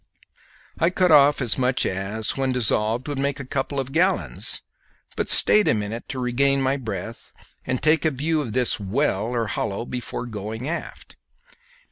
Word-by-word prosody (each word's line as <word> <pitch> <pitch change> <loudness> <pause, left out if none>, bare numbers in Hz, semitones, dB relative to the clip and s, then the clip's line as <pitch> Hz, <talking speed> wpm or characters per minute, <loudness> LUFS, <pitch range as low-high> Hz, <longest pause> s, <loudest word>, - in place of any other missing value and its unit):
I 165 - +3
cut 185 -1 +2
off 145 -2 +5
as 120 +1 -1
much 125 0 +1
as, 95 +3 -2
when 135 -1 0
dissolved, 115 0 0
would 145 -2 -3
make 140 +1 -1
a 140 - -6
couple 140 +1 -3
of 135 0 -4
gallons, 180 +6 0 0.5
but - - -2
stayed 210 -1 +6
a - - +3
minute 105 +2 -5
to 135 - -5
regain 135 +2 +1
my 135 0 +1
breath 115 -3 -7 0.4
and 130 0 -2
take 155 0 +3
a 160 - +3
view 155 +3 -1
of 120 -7 -5
this 125 -2 +2
well 105 +1 0
or 120 -1 -1
hollow 100 +2 -3
before 125 0 -5
going 110 +2 -6
aft. 170 +2 -6
130 Hz, 170 wpm, -23 LUFS, 110-140 Hz, 0.5 s, stayed